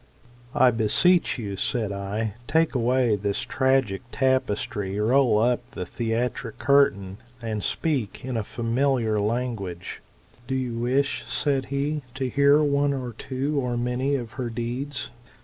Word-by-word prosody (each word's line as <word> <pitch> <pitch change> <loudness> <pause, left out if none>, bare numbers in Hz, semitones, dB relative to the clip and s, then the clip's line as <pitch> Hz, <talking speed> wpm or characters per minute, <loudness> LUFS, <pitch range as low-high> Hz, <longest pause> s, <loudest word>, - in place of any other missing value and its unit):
"I 130 -1 +6
beseech 130 - +3
you, 100 -5 -4
said 110 +1 -1
I, 100 +2 -3
take 160 +2 +2
away 125 -2 +2
this 100 0 -2
tragic 130 -7 +1
tapestry, 105 -6 0
roll 120 0 +4
up 120 +2 +2
the 90 - -5
theatric 115 +2 -2
curtain, 100 -9 +3 0.2
and 110 -3 -3
speak 135 - -1
in 125 -4 -1
familiar 115 0 0
language. 105 -5 -3 0.5
Do 130 - -1
you 125 -3 -2
wish, 135 +4 0
said 135 -3 0
he, 145 +2 -2
to 135 -1 -2
hear 140 +3 +4
one 145 -1 +2
or 125 -3 -4
two, 135 +5 -2
or 125 -2 -1
many 125 +3 0
of 120 -4 -4
her 120 - -2
deeds 125 +4 -4
125 Hz, 135 wpm, -25 LUFS, 110-135 Hz, 0.5 s, I